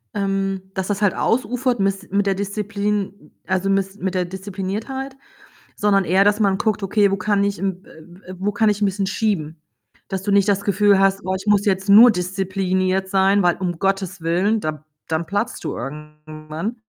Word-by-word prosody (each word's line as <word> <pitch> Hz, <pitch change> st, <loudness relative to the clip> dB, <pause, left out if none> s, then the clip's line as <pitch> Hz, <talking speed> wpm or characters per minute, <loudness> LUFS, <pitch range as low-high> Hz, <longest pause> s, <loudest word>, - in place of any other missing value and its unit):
ähm, 195 Hz, -1 st, -1 dB
dass 190 Hz, -1 st, -3 dB
das 205 Hz, 0 st, -2 dB
halt 205 Hz, -, +3 dB
ausufert 250 Hz, +1 st, 0 dB
mis 195 Hz, 0 st, -1 dB
mit 200 Hz, +1 st, +1 dB
der 195 Hz, -, +2 dB
Disziplin, 205 Hz, 0 st, -2 dB
m -, -, -21 dB
also, 185 Hz, +1 st, -1 dB
mis 195 Hz, 0 st, 0 dB
mit 190 Hz, -1 st, -3 dB
der 180 Hz, -1 st, +1 dB
Diszipliniertheit, 200 Hz, +8 st, -5 dB, 0.6 s
sondern 200 Hz, -2 st, +2 dB
eher, 190 Hz, +3 st, +4 dB
dass 205 Hz, +1 st, +2 dB
man 200 Hz, -3 st, +2 dB
guckt: 215 Hz, -1 st, -1 dB
„Okay, 200 Hz, +1 st, +2 dB
wo 195 Hz, -, 0 dB
kann 200 Hz, +1 st, +1 dB
ich, 200 Hz, 0 st, -1 dB
m 190 Hz, -1 st, -3 dB
äh, 160 Hz, -, -15 dB
w 175 Hz, +3 st, -18 dB
äh, 185 Hz, -, -8 dB
wo 200 Hz, +2 st, 0 dB
kann 220 Hz, 0 st, +3 dB
ich 205 Hz, -1 st, 0 dB
'n 205 Hz, -, +4 dB
bisschen 195 Hz, 0 st, -1 dB
schieben?“ 190 Hz, -7 st, -1 dB, 0.5 s
Dass 190 Hz, -1 st, -4 dB
du 205 Hz, -, -1 dB
nicht 200 Hz, 0 st, +4 dB
das 200 Hz, -1 st, +1 dB
Gefühl 200 Hz, 0 st, +3 dB
hast: 195 Hz, 0 st, +2 dB
„Oh, 185 Hz, 0 st, -1 dB
ich 195 Hz, +3 st, -7 dB
muss 205 Hz, -1 st, +3 dB
jetzt 195 Hz, -1 st, 0 dB
nur 225 Hz, +5 st, +9 dB
diszipliniert 185 Hz, 0 st, -1 dB
sein“, 195 Hz, +1 st, +3 dB
weil 175 Hz, -1 st, +2 dB
um 175 Hz, -2 st, -3 dB
Gottes 190 Hz, -1 st, -1 dB
willen, 180 Hz, +7 st, +1 dB
da 155 Hz, -2 st, -5 dB, 0.2 s
dann 160 Hz, +1 st, -1 dB
platzt 205 Hz, +7 st, -3 dB
du -, -, -3 dB
irgendwann. 155 Hz, -, -7 dB
195 Hz, 200 wpm, -21 LUFS, 185-205 Hz, 0.6 s, nur